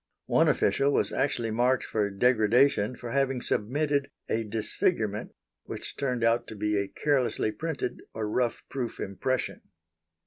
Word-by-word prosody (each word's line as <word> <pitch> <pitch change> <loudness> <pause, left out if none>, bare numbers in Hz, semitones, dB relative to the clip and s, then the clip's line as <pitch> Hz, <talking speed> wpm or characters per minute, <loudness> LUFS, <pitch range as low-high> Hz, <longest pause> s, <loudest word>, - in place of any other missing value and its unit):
One - - +3
official 140 +1 +3
was - - +2
actually 120 -4 0
marked 125 +3 +2
for 105 -2 0
degradation 115 +2 +3
for 120 -1 -7
having 135 -1 +1
submitted 140 +5 0 0.2
a 115 - 0
disfigurement 110 - -1 0.3
which - - -6
turned 125 -4 -1
out 115 +1 +2
to 110 - -8
be 105 0 0
a 100 -1 0
carelessly 130 -4 0
printed, 155 -1 -3
or 110 -1 -3
rough, 120 +2 0
proof 125 -4 -4
impression. 100 +7 -2
120 Hz, 140 wpm, -28 LUFS, 110-135 Hz, 0.3 s, One